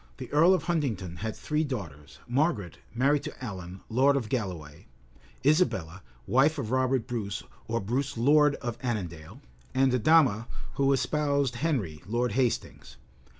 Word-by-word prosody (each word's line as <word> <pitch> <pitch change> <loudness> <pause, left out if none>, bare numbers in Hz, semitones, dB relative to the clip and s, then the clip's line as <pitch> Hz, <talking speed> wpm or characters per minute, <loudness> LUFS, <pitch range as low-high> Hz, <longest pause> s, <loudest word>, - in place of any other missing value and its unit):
The - - -8
earl 165 +6 +6
of - - -3
Huntingdon 120 - -2
had 110 +4 -4
three 150 +1 -1
daughters; 85 - -6
Margaret, 120 - 0 0.2
married 140 +4 +3
to - - -8
Alan, 95 -3 -7
lord 135 +5 +3
of 120 -6 -2
Galloway, 90 - -4 0.6
Isabella, 95 - +2 0.2
wife 140 +5 +3
of 120 -6 -3
Robert 130 -2 +1
Brus 110 -5 -4 0.2
or 115 +1 0
Bruce 130 +6 -2
lord 145 +4 +4
of 120 -1 -5
Annandale, 90 - -4 0.3
and 130 0 +4
Adama, 125 -4 +4 0.3
who 140 0 +2
espoused 140 -2 +1
Henry, 120 - -1
Lord 120 +2 0
Hastings. 125 +1 -2
125 Hz, 140 wpm, -28 LUFS, 100-140 Hz, 0.6 s, earl